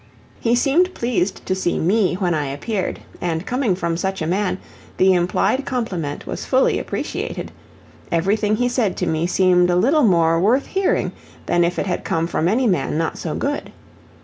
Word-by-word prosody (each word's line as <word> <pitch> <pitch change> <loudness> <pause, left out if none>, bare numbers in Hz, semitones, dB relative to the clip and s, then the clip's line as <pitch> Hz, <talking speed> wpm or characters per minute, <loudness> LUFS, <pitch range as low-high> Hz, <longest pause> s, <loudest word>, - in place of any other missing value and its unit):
He 235 +1 +2
seemed 320 +9 +2
pleased 220 -6 -1
to - - 0
see 185 -2 -1
ME 190 +2 +2
when 180 -2 0
I 150 -3 -1
appeared, 185 +9 -3 0.2
and 165 0 -2
coming 250 -6 0
from 170 -2 -2
such 190 +2 -2
a 160 - -2
man, 185 +3 0 0.4
the 190 0 +5
implied 185 +8 +1
compliment 190 - -3
was - - -5
fully 260 0 +2
appreciated; - - -4 0.6
everything 205 +5 +1
he 245 +3 +1
said 240 -6 0
to 180 - -1
me 160 0 0
seemed 180 -1 +3
a 175 - +2
little 275 - +3
more 165 - +3
worth 235 +10 +3
hearing 385 0 0 0.3
than 175 0 +2
if 175 +1 0
it - - -1
had 180 -2 -2
come 165 0 0
from 165 -1 0
any 235 +7 +2
man 180 -7 +1
not 165 0 -2
so 160 - -3
good. 285 +1 -3
185 Hz, 180 wpm, -21 LUFS, 170-235 Hz, 0.6 s, the